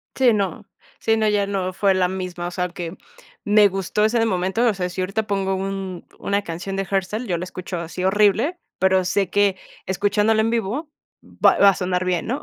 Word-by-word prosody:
Sí, 250 -4 +4
no. 195 -5 -2 0.3
Sí, 225 - +2
no, 220 -1 +1
ya 205 -1 +1
no, 190 -2 -2
fue 195 +1 +2
la 185 -1 +2
misma 180 -2 -4
o - - -5
sea, 180 0 -2
que 175 0 -7 0.5
me 205 -1 +5
gustó 195 +2 -1
ese 225 +1 +2
momento, 190 +4 0
o 220 - +3
sea, 180 -2 -3
si 185 - -7
ahorita 210 +4 -2
pongo 195 -1 0
un 190 -2 -4
una 200 0 -1
canción 180 +3 -5
de 195 - -1
hardstyle, 195 +5 -2
yo 175 -2 0
la 180 - -4
escucho 185 0 -6
así 170 +2 -5
horrible, 210 - +3 0.2
pero 190 -1 +3
sé 190 0 0
que 200 -1 +2 0.3
escuchándola 205 +3 +2
en 225 - +1
vivo 235 +7 -2 0.3
va - - +2
va 200 - +7
a - - +3
sonar 180 0 -1
bien, 180 0 -1
¿no? 260 +5 -2
195 Hz, 210 wpm, -22 LUFS, 185-210 Hz, 0.5 s, va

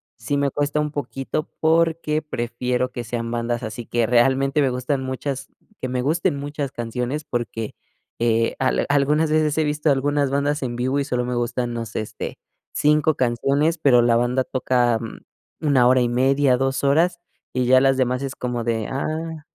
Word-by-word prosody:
sí 120 +6 -2
me 140 0 +1
cuesta 145 +2 -1
un 150 0 -1
poquito, 145 +2 -4
porque 160 -1 +2
prefiero 125 -2 -2
que 120 - -4
sean 115 0 -4
bandas 120 0 -2
así 110 +1 -6
que 120 0 0
realmente 135 +4 +3
me 135 - +3
gustan 130 +2 -2
muchas 130 +1 -4 0.3
que 130 - -3
me 125 0 -1
gusten 150 +1 +1
muchas 145 -1 -4
canciones, 125 +5 -3
porque, 115 -2 -4 0.4
eh, 115 -1 +1 0.3
algunas 150 +2 +2
veces 155 -1 +2
he 160 - +3
visto 150 +1 0
algunas 140 +1 +1
bandas 145 +2 0
en 120 -3 -3
vivo 130 +3 0
y - - +1
solo 125 -3 -1
me 125 - -2
gustan, 120 0 -1
no 115 -1 -3
sé, 110 - -3
este, 110 - -6 0.3
5 150 +1 +2
canciones, 140 +7 +1
pero 130 -5 +5
la 120 -1 +3
banda 120 +2 +1
toca 125 -3 +1 0.6
1 135 -5 +3
hora 130 0 +5
y 120 - +2
media, 135 +2 +3
2 135 +1 -1
horas, 170 +5 +3 0.3
y 125 0 0
ya 130 +1 +5
las 135 -1 +3
demás 125 0 0
es 135 0 -4
como 125 -1 -3
de, 115 -2 -1
ah 155 +3 -4
130 Hz, 180 wpm, -22 LUFS, 120-145 Hz, 0.6 s, pero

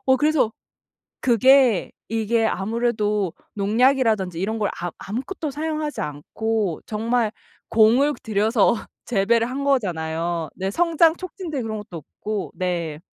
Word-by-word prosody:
어 260 0 +5
그래서 295 -5 +2 0.7
그게 255 -2 +4 0.2
이게 225 +1 +1
아무래도 210 -3 0 0.2
농약이라든지 215 -4 +2
이런 220 +4 -2
걸 205 - +1
아 175 0 -3
아무것도 275 - -4
사용하지 305 +1 -3
않고 185 +6 -2
정말 225 +1 0 0.4
공을 235 +7 +4
들여서 220 0 +2 0.3
재배를 230 +2 +2
한 270 +2 -3
거잖아요. 170 - -1
네. 190 +1 -2
성장 330 +2 +3
촉진제 350 -6 -5
그런 220 -1 -3
것도 190 -4 -8
없고. 205 +6 -5
네. 170 -5 -2
225 Hz, 275 characters per minute, -23 LUFS, 195-260 Hz, 0.7 s, 어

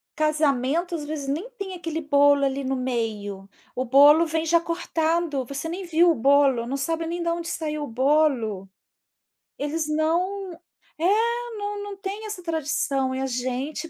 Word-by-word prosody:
casamento 305 +2 +1
às 300 -2 -5
vezes 290 -2 -5
nem 340 - -3
tem 395 -5 -6
aquele 330 -2 -4
bolo 285 -1 +4
ali 275 0 0
no 265 0 0
meio. 215 -6 -3 0.3
O 255 +1 -1
bolo 290 +6 +7
vem 320 +1 -1
já 335 +1 +4
cortado, 330 -4 -1
você 280 +5 -5
nem 365 +2 -5
viu 340 +1 +4
o - - 0
bolo, 270 -1 +3
não 270 - -2
sabe 325 +4 -2
nem 340 +1 -3
da 335 0 0
onde 340 0 -5
saiu 305 -3 -3
o - - -9
bolo. 245 -7 +1 0.9
Eles 305 +2 -2
não 360 +6 0 0.5
é, 335 - 0 0.5
não 410 0 -4
não 405 -1 -7
tem 405 +3 -5
essa 395 -4 -6
tradição. 280 -5 -1
E - - -3
a - - 0
gente 260 +5 -3
305 Hz, 170 wpm, -24 LUFS, 270-335 Hz, 0.9 s, bolo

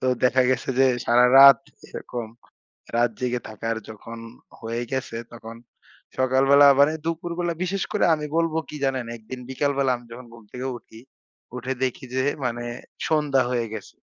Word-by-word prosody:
তো 130 - -2 0.2
দেখা 125 +1 +4
গেছে 130 -1 -1
যে, 135 - +6 0.2
সারারাত 125 +2 +8 0.3
এরকম 120 -2 -6 0.7
রাত 120 0 +3
জেগে 125 -1 -1
থাকার 115 +1 -4
যখন 115 +2 -10 0.4
হয়ে 115 +1 -4
গেছে। 130 -3 -3 0.2
তখন 115 -1 -10 0.6
সকালবেলা 135 +2 +5
মানে, 145 +2 +5
দুপুরবেলা 170 +1 -2
বিশেষ 190 +1 -1
করে 210 - +1
আমি 150 -1 -4
বলব 165 -1 +1
কি 150 - -8
জানেন? 130 -2 -1
একদিন 120 +3 -9
বিকালবেলা 140 0 0
আমি 120 - -15
যখন 125 +1 -10
ঘুম 115 -2 -15
থেকে 125 +1 -4
উঠি। 110 - -16 0.6
উঠে 125 +2 -3
দেখি 130 0 -3
যে 130 - +1 0.2
মানে, 120 -1 -2 0.4
সন্ধ্যা 150 -4 +2
হয়ে 120 -2 -1
গেছে। 105 -4 -9
130 Hz, 155 wpm, -24 LUFS, 120-140 Hz, 0.7 s, সারারাত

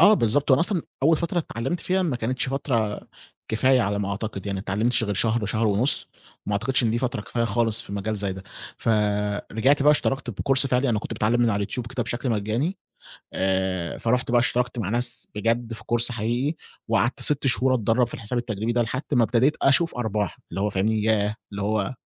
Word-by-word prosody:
آه، 205 +6 +8
بالضبط. 140 - +1
وأنا 130 - +5
أصلًا 175 0 +1 0.2
أول 160 +3 +5
فترة 170 +2 -1
اتعلّمت 140 +1 -3
فيها 190 +1 +1
ما 155 -8 -1
كانتش 125 +3 -2
فترة 120 -6 -1 0.5
كفاية 130 +3 +3
على 100 -2 0
ما 100 -1 -2
أعتقد 100 -1 -5
يعني 100 -1 -2
ما - - -3
اتعلمتش 115 +4 +1
غير 105 -1 -2
شهر، 110 +2 +1
شهر 110 +3 0
ونُص، 110 +7 +2 0.4
وما 105 - -2
أعتقدش 125 +6 +1
إن 115 - +2
دي 115 - 0
فترة 125 -1 -2
كفاية 115 +3 -2
خالص 115 0 +1
في - - -10
مجال 105 +2 -2
زي 100 -1 -2
ده، 95 0 -9 0.3
فرجعت 105 +5 +1
بقى 150 - +6
اشتركت 135 -3 -1
بcourse 135 +5 +2
فِعلي، 130 +1 +1
أنا 110 -3 +1
كنت - - -6
باتعلم 115 +3 +1
من 120 - +4
على 100 - 0
اليوتيوب 100 +4 -3
كده 120 +1 -3
بشكل 120 +2 -3
مجاني 115 - -1 0.6
آآ 95 -2 -1
فرُحت 125 +1 0
بقى 120 - +5
اشتركت 120 0 0
مع 100 -4 -2
ناس 120 +3 +1
بجد 115 +2 -1
في 115 - -7
course 120 +1 +2
حقيقي 120 +7 -1 0.3
وقعدت 115 +2 +1
6 145 -2 +1
شهور 130 0 +3
أتدرّب 120 0 +2
في - - -11
الحساب 115 +2 -4
التجريبي 110 -1 -2
ده، 120 0 +1
لحد 120 +3 -2
ما 125 -4 +4
ابتديت 125 +6 +2
أشوف 155 +5 +3
أرباح، 105 -6 -2
اللي 95 - -4
هو، 105 - +1
فاهمني؟ 105 +2 0
ياه! 105 -1 +1 0.2
اللي 100 0 -5
هو 105 +1 -1
115 Hz, 205 wpm, -24 LUFS, 105-130 Hz, 0.6 s, آه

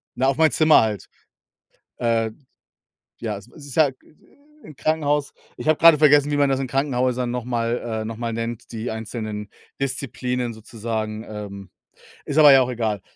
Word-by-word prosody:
na, 130 +2 +1
auf 135 +1 +1
mein 160 -1 +4
Zimmer 155 -1 +5
halt. 110 -3 -2 0.9
Äh, 115 -1 +1 0.9
ja, 110 -3 -3
es 100 - -12
ist 145 -4 -11
ja, 155 -3 +5
äh, - - -7 0.7
im 155 - -11
Krankenhaus. 150 -2 0 0.2
Ich - - -5
habe 155 - +3
grade 165 -2 +7
vergessen, 145 -1 +5
wie 145 - 0
man 145 -1 +3
das 135 0 +1
in 135 - -2
Krankenhäusern 125 -2 0
noch 125 -1 -3
mal, 120 -1 -1 0.2
äh - - -6
noch 115 0 -5
mal 115 -1 -3
nennt, 115 +1 -5
die 115 +1 -4
einzelnen 110 -2 -5 0.3
Disziplinen 125 -2 -2
sozusagen, 110 0 -5
ähm, 100 -3 -8 0.6
ist 145 - -3
aber 150 -2 +9
ja 135 - +7
auch 125 - 0
egal. 110 -5 -2
125 Hz, 175 wpm, -22 LUFS, 110-140 Hz, 0.9 s, aber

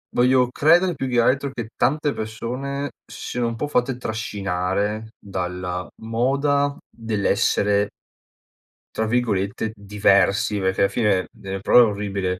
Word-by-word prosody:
Voglio 125 0 +4
credere 175 +7 +4
più 135 - -3
che 120 -2 +2
altro 135 +3 +1
che 120 -3 -5
tante 145 +4 +1
persone 125 +6 -4 0.2
si - - -8
siano 120 -1 -1
un 115 - -3
po' 145 - -3
fatte 125 -2 0
trascinare 105 -1 -2
dalla 90 -2 -4
moda 140 +5 +1
dell'essere 105 -2 +1 1.1
tra 110 - 0
virgolette 110 -2 0
"diversi", 100 0 +2
perché 95 0 0
alla 100 - +4
fine 105 -5 +1
delle 95 0 -6
prove 125 - +6
orribile, 100 -3 -2
110 Hz, 125 wpm, -22 LUFS, 100-125 Hz, 1.1 s, prove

